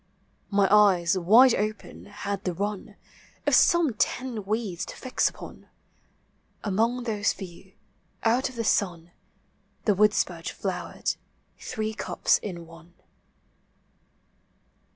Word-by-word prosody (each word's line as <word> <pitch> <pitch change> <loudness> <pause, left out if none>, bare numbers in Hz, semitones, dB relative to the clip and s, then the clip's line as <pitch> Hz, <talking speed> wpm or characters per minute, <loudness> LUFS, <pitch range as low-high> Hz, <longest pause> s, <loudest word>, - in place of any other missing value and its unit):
My 200 -1 +3
eyes, 195 -4 +5
wide 225 +8 +6
open, 215 +1 -4
had 200 -1 -5
the 180 -2 -2
inn 205 +1 -4 0.5
Of - - +1
some 345 - +4
ten 235 0 -2
weeds 210 -4 -2
to - - -8
fix 255 - 0
npon; - - -12 1.0
Anions 230 +5 0
those 210 -3 0
few, 185 0 -11 0.5
out 240 +4 +2
of 255 - -13
the 230 - -2
sun. 175 -5 0 0.7
The 210 - +4
woodspurge 190 -4 +1
flowered, 180 -3 -3 0.5
three 220 0 -4
cups - - +1
in 175 -5 -7
one. 165 +1 -16
205 Hz, 110 wpm, -26 LUFS, 180-225 Hz, 1.0 s, wide